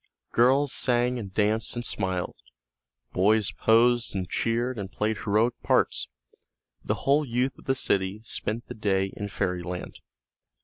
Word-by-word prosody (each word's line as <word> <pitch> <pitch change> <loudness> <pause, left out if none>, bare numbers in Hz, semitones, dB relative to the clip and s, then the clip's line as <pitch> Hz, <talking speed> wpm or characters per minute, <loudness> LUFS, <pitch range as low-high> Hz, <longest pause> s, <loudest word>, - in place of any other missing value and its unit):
Girls 130 +4 +3
sang 125 0 +2
and 100 -4 -7
danced 110 +4 0
and 120 0 -4
smiled, 95 -4 -2 0.8
boys 105 +2 +3
posed 120 0 +3
and 95 -2 -2
cheered 120 +4 -1
and 95 -1 -6
played 110 +1 -1
heroic 110 +3 +1
parts, - - +2 0.8
the - - 0
whole 145 +2 +4
youth 125 0 -1
of - - -17
the 135 - +1
city 95 -4 0
spent 115 0 -3
the - - -7
day 95 -2 0
in 100 0 -5
fairy 90 -2 -2
land. 90 +1 -6
110 Hz, 145 wpm, -26 LUFS, 95-120 Hz, 0.8 s, whole